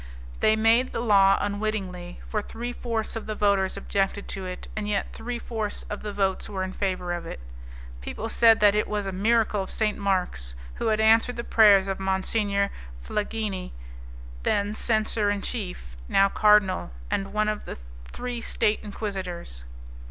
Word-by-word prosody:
They -, -, +4 dB
had 220 Hz, -, +4 dB
made 230 Hz, +3 st, +3 dB
the -, -, -2 dB
law 195 Hz, -4 st, +5 dB
unwittingly, 200 Hz, -4 st, -3 dB
for 210 Hz, -, -1 dB
three 240 Hz, +3 st, -6 dB
fourths 230 Hz, -3 st, -3 dB
of 225 Hz, -, -5 dB
the 215 Hz, -, -3 dB
voters 200 Hz, -2 st, +2 dB
objected 195 Hz, 0 st, -1 dB
to 190 Hz, -1 st, -4 dB
it, 180 Hz, -, -7 dB
and 210 Hz, -1 st, -3 dB
yet 205 Hz, -1 st, -1 dB
three 240 Hz, +2 st, -4 dB
fourths 220 Hz, -3 st, -4 dB
of 210 Hz, -, -4 dB
the 210 Hz, -, -4 dB
votes 195 Hz, -2 st, -1 dB
were 190 Hz, -2 st, -2 dB
in 185 Hz, 0 st, -4 dB
favour 185 Hz, -3 st, -2 dB
of 175 Hz, -, -5 dB
it. -, -, -7 dB, 0.6 s
People 210 Hz, -, -5 dB
said 225 Hz, -1 st, +5 dB
that 205 Hz, -1 st, +6 dB
it 210 Hz, -, +1 dB
was 210 Hz, -1 st, -2 dB
a 195 Hz, -, -2 dB
miracle 215 Hz, +1 st, +2 dB
of 190 Hz, -, -6 dB
St. 215 Hz, -1 st, -1 dB
Mark's, 180 Hz, -, -1 dB, 0.2 s
who -, -, -3 dB
had 215 Hz, -1 st, +2 dB
answered 225 Hz, +3 st, +4 dB
the 235 Hz, -, -4 dB
prayers 205 Hz, -5 st, +6 dB
of 195 Hz, 0 st, -2 dB
Monsignor 200 Hz, +1 st, 0 dB, 0.3 s
Flangini, 210 Hz, -, -3 dB, 0.7 s
then 205 Hz, -, 0 dB
censor 215 Hz, -1 st, +1 dB
in 205 Hz, -1 st, -1 dB
chief, -, -, -4 dB
now 195 Hz, 0 st, +4 dB
cardinal, 210 Hz, -, +4 dB, 0.2 s
and 195 Hz, 0 st, -1 dB
one 215 Hz, +1 st, +1 dB
of 215 Hz, 0 st, -2 dB
the -, -, -6 dB, 0.3 s
three 245 Hz, -, -5 dB
State 210 Hz, -1 st, +1 dB
Inquisitors. 190 Hz, -, -5 dB
205 Hz, 175 wpm, -26 LUFS, 190-220 Hz, 0.7 s, that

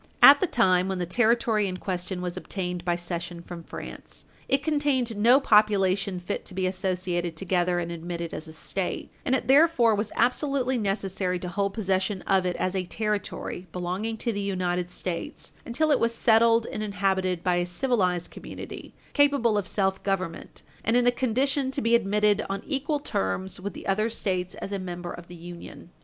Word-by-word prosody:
At 285 Hz, +1 st, +11 dB
the 370 Hz, -, +1 dB
time 185 Hz, -, +3 dB
when 190 Hz, -1 st, -2 dB
the 180 Hz, -, -1 dB
Territory 220 Hz, +1 st, +2 dB
in 185 Hz, -1 st, -4 dB
question 180 Hz, 0 st, -4 dB
was 180 Hz, -1 st, -3 dB
obtained 180 Hz, -3 st, -4 dB
by 175 Hz, -1 st, +1 dB
cession 175 Hz, 0 st, -5 dB
from 175 Hz, -1 st, -8 dB
France, -, -, -9 dB, 0.2 s
it 270 Hz, +1 st, +2 dB
contained 285 Hz, -6 st, +1 dB
no 235 Hz, +6 st, +6 dB
population 200 Hz, -5 st, +3 dB
fit 180 Hz, -, -4 dB
to 185 Hz, -, -7 dB
be 185 Hz, -1 st, 0 dB
associated 185 Hz, -2 st, -1 dB
together 180 Hz, -1 st, +1 dB
and 170 Hz, -1 st, -2 dB
admitted 170 Hz, 0 st, -5 dB
as 160 Hz, -, -5 dB
a 160 Hz, -, -9 dB
State, 180 Hz, +3 st, -3 dB
and 260 Hz, -, +2 dB
it -, -, -2 dB
therefore 270 Hz, -5 st, +5 dB
was 210 Hz, +1 st, -1 dB
absolutely 260 Hz, +1 st, +1 dB
necessary 195 Hz, -3 st, -1 dB
to 180 Hz, 0 st, -5 dB
hold 200 Hz, +1 st, -1 dB
possession 190 Hz, -2 st, 0 dB
of 190 Hz, -1 st, +2 dB
it, 180 Hz, -, -1 dB
as 185 Hz, +1 st, -1 dB
a 190 Hz, -, 0 dB
Territory 205 Hz, -3 st, -3 dB
belonging 185 Hz, +6 st, -3 dB
to 235 Hz, +1 st, -1 dB
the 205 Hz, -, -2 dB
United 180 Hz, -2 st, -1 dB
States, 180 Hz, -1 st, -5 dB, 0.2 s
until 305 Hz, +6 st, +1 dB
it -, -, +4 dB
was 230 Hz, 0 st, +1 dB
settled 230 Hz, 0 st, +4 dB
and -, -, -4 dB
inhabited 190 Hz, -3 st, 0 dB
by 180 Hz, -1 st, +2 dB
a 175 Hz, -, +1 dB
civilized 180 Hz, -3 st, 0 dB
community -, -, -9 dB, 0.2 s
capable 280 Hz, -6 st, +3 dB
of 205 Hz, -3 st, 0 dB
self 190 Hz, -2 st, 0 dB
government, 185 Hz, -4 st, -3 dB, 0.2 s
and 225 Hz, +3 st, +3 dB
in 245 Hz, -, +3 dB
a 245 Hz, -, +6 dB
condition 260 Hz, +3 st, 0 dB
to 270 Hz, -, -2 dB
be 230 Hz, -3 st, +1 dB
admitted 210 Hz, -2 st, +3 dB
on 195 Hz, 0 st, -3 dB
equal 290 Hz, +1 st, -1 dB
terms 185 Hz, -, -2 dB
with 195 Hz, 0 st, -5 dB
the -, -, -9 dB
other 215 Hz, +3 st, +1 dB
States 185 Hz, -5 st, -2 dB
as 195 Hz, -, -6 dB
a 200 Hz, -, -2 dB
member 175 Hz, -1 st, -5 dB
of 170 Hz, 0 st, -10 dB
the 175 Hz, -, -10 dB
Union. 175 Hz, 0 st, -10 dB
195 Hz, 185 wpm, -26 LUFS, 180-230 Hz, 0.2 s, At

